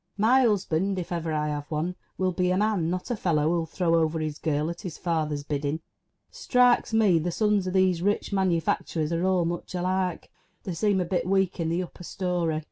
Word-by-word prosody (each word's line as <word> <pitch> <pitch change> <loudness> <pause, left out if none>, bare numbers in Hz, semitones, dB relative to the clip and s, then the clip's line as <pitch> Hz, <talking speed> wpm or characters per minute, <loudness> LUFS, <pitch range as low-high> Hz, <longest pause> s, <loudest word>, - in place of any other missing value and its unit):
My 235 +6 +4
husband, 195 -4 +1
if 180 -1 -5
ever 165 -2 -2
I 150 -1 0
have 145 -1 -4
one, 165 +4 -2 0.2
will 185 -1 +1
be 180 +1 0
a 185 - +2
man, 205 -5 +1
not 180 +7 -3
a - - +1
fellow 155 -6 +1
who'll 170 -1 0
throw 165 +1 0
over 160 -1 +2
his 155 -1 -3
girl 155 0 0
at 170 - -9
his 180 -6 -6
father's 155 -4 -1
bidding! 145 +1 -2 0.5
Strikes 250 - +3
me 210 -6 +4
the 170 +3 -2
sons 210 +1 +1
of 185 - -2
these 185 -3 +3
rich 205 +2 0
manu 185 -4 +2
facturers 155 0 -1
are 170 +1 0
all 185 -2 +2
much 175 +2 -4
alike. 185 0 -1 0.3
They 185 - -4
seem 195 +2 +1
a - - -1
bit 180 0 -1
weak 190 -1 +1
in 165 -1 0
the 170 +2 0
upper 180 0 -11
storey. 175 -4 -1
175 Hz, 210 wpm, -26 LUFS, 160-190 Hz, 0.5 s, My